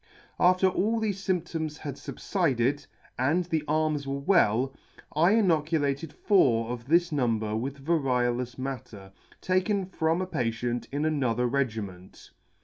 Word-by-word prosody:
" - - -34
After 185 +1 +3
all 215 +5 +1
thefe 220 -1 0 0.2
fymptoms 160 -4 -1
had 145 -3 -5
fubflded, 145 - -1 0.3
and 160 +8 +2
the 160 -3 -1
arms 155 -2 0
were 135 0 -2
well, 135 - +2 0.4
I 170 +6 +4
inoculated 160 -7 +1
four 120 - +2
of 120 0 -6
this 170 +3 +3
number 115 -6 0
with 135 +4 -4
variolous 125 -6 0
matter 120 -7 -6 0.3
taken 185 +2 +1
from 165 -2 0
a 185 - -1
patient 120 -6 -2
in 145 +2 -1
another 125 -6 +1
regiment. 110 -8 -3
145 Hz, 135 wpm, -27 LUFS, 125-170 Hz, 0.4 s, I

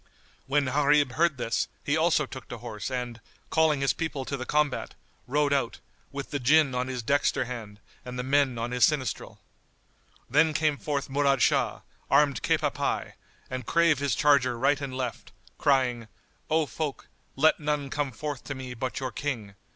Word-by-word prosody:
When 140 +1 +2
Gharib 145 +1 +3
heard 165 +1 +2
this, 120 -2 -1 0.2
he 145 - +1
also 160 -2 +3
took 130 0 -10
to 125 - -7
horse 115 -2 -6
and, 125 -3 -4 0.3
calling 160 -3 +3
his 135 - +2
people 145 -5 -3
to 140 - -3
the 130 -1 -6
combat, 150 -3 0 0.3
rode 145 +2 +2
out, 135 -5 0 0.3
with 140 0 -6
the 145 - -1
Jinn 140 +2 +4
on 125 0 -1
his 125 -2 -4
dexter 140 +5 +1
hand 110 -4 -7 0.2
and 125 0 -7
the 125 - -2
men 135 -2 +2
on 115 +1 -3
his 125 -1 +1
sinistral. 140 -4 0 0.9
Then 155 +3 +3
came 155 -2 +1
forth 145 -2 -2
Murad 140 -2 +2
Shah, - - +2 0.3
armed 145 -3 +3
cap - - +1
à - - 0
pie - - -2 0.3
and 130 0 -5
drave 165 +2 +3
his 140 -4 0
charger 140 -5 +3
right 140 +4 +2
and 130 -2 -4
left, 125 -3 -5 0.3
crying, 125 -5 +2 0.4
"O 160 0 +3
folk, 145 +3 -4 0.3
let 155 +4 +4
none 150 -2 -2
come 145 -2 -1
forth 145 +3 -5
to 140 - -4
me 130 -1 -6
but 125 -1 -3
your 130 -1 -3
King. 115 -6 -4
135 Hz, 180 wpm, -27 LUFS, 125-150 Hz, 0.9 s, Jinn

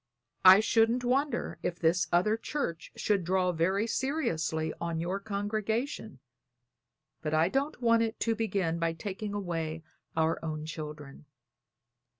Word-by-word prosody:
I 190 +2 +10
shouldn't 230 +3 +3
wonder 275 +4 0
if 175 - -2
this 170 +1 +2
other 185 +5 +3
church 225 - -4
should 200 -3 +1
draw 180 +1 +2
very 185 +5 +1
seriously 160 - -1
on 170 -1 -2
your 180 +4 -2
congregation; 215 - -2 1.0
but 155 0 -1
I 160 +3 +3
don't 275 +5 -1
want 230 -1 +5
it 225 0 -2
to 230 - +2
begin 195 -7 -1
by 165 -1 0
taking 200 +4 -5
away 165 -5 -3 0.3
our 160 0 +2
own 155 -1 -4
children. 150 -2 -8
185 Hz, 135 wpm, -30 LUFS, 165-225 Hz, 1.0 s, I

